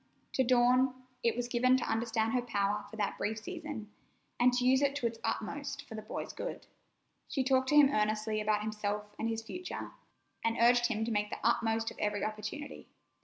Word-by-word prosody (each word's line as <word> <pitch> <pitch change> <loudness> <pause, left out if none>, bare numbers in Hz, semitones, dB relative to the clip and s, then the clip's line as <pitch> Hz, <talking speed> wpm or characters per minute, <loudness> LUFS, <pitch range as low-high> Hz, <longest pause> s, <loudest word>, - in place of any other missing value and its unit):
To 260 - +3
Dawn, 255 +1 +4 0.3
it 230 - +2
was 245 0 -2
given 255 +1 +4
to 260 - -2
understand 225 0 0
her 250 - +2
power 205 -3 -1
for - - -10
that 205 -2 -2
brief 215 +1 -1
season, 300 - -6 0.5
and 245 +1 +6
to 250 0 +1
use 260 +1 +5
it 280 0 +2
to 270 - -2
its 230 -1 -1
utmost 285 +4 -3
for - - -9
the 215 - -5
boy's - - -5
good. - - -5 0.6
She 270 - 0
talked 260 0 +2
to 295 - +3
him 290 -2 +8
earnestly 215 0 +1
about 210 0 +1
himself 210 -1 -3
and 225 - 0
his 225 0 -2
future, 360 +10 -6 0.5
and 225 0 +1
urged 240 +1 +5
him 220 -2 -1
to 235 - -2
make 210 -1 0
the - - -4
utmost 225 -1 +1
of - - -13
every 210 -1 0
opportunity. 215 +7 -5
230 Hz, 200 wpm, -32 LUFS, 215-255 Hz, 0.6 s, him